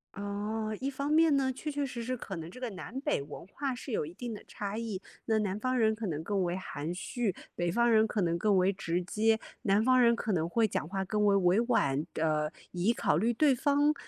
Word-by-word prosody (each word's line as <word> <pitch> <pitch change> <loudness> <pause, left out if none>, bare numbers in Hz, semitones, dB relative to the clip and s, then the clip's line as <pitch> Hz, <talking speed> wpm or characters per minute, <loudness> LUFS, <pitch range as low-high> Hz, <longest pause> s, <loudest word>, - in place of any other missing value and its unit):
哦， 210 +2 -3
一 270 +1 -1
方 280 +2 -3
面 320 -2 +5
呢， 265 -1 +2
确 300 +4 -5
确 285 -1 -1
实 245 -3 -5
实 255 +2 -2
可 195 -6 -6
能 165 +1 -6
这 220 - -12
个 250 -1 -3
南 225 +7 -7
北 295 - 0
文 145 - -9
化 270 +5 -3
是 255 +2 -8
有 180 - 0
一 160 - -9
定 235 +4 -5
的 210 - -8
差 205 +1 -5
异， 220 -5 -4 0.2
那 220 -1 +2
南 200 0 -1
方 255 +2 0
人 220 -2 +3
可 215 -2 -4
能 155 -1 -3
更 200 +1 0
为 175 0 -1
含 165 -3 -4
蓄， 215 +1 -2 0.2
北 175 0 -1
方 235 +6 +3
人 220 0 +5
可 210 - -1
能 170 -1 +1
更 210 +1 +2
为 185 +1 +4
直 180 -2 -2
接， 220 +4 +2 0.3
南 205 -1 +3
方 255 +1 +5
人 235 -1 +5
可 225 -2 -2
能 165 -3 +1
会 225 +6 +2
讲 155 - -2
话 190 +1 -2
更 210 +2 0
为 200 -1 +5
委 185 +2 +4
婉， 145 - +2
呃， 155 -1 +1 0.2
以 185 +6 +1
考 150 - +1
虑 230 +6 +2
对 290 +3 +4
方 290 +3 +3
215 Hz, 260 characters per minute, -30 LUFS, 180-245 Hz, 0.3 s, 面